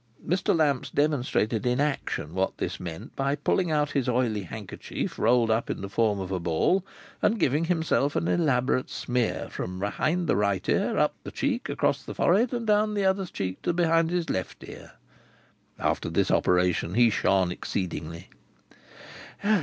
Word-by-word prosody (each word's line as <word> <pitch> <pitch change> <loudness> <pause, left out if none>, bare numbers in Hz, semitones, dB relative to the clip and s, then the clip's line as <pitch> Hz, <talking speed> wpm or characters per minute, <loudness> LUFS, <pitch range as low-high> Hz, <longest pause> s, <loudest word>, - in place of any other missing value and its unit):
Mr. 180 +2 +1
Lamps 145 -5 +1
demonstrated 125 -7 0
in 125 +1 +1
action 140 - -2
what 95 +1 -1
this - - -3
meant, 90 - -8
by 140 +1 0
pulling 170 +4 0
out 150 -2 +1
his 135 -3 0
oily 120 -4 +1
handkerchief 100 +2 -6
rolled 115 0 +3
up 115 +1 0
in - - -3
the 100 - -5
form 105 -1 +1
of 95 -1 -5
a 95 - -1
ball, 85 - +1 0.4
and 220 +1 +2
giving 150 +1 +2
himself 160 -4 +1
an 165 - 0
elaborate 130 -7 +1
smear, 125 -2 -1
from 90 +1 -5
behind 155 - -1
the - - +2
right 100 -2 0
ear, - - +1
up - - +3
the - - -6
cheek, - - -2
across - - 0
the - - -8
forehead, 220 +7 +3
and 240 -2 -3
down 210 0 +2
the 200 -1 +1
other 190 0 +1
cheek 95 - -4
to 175 - 0
behind 165 -1 +2
his 175 -1 -1
left 95 -1 -4
ear. - - -11 0.8
After - - -1
this - - +1
operation 90 0 +2
he 120 -1 +5
shone 95 -3 +2
exceedingly. 85 -3 -4
125 Hz, 170 wpm, -27 LUFS, -, 0.8 s, he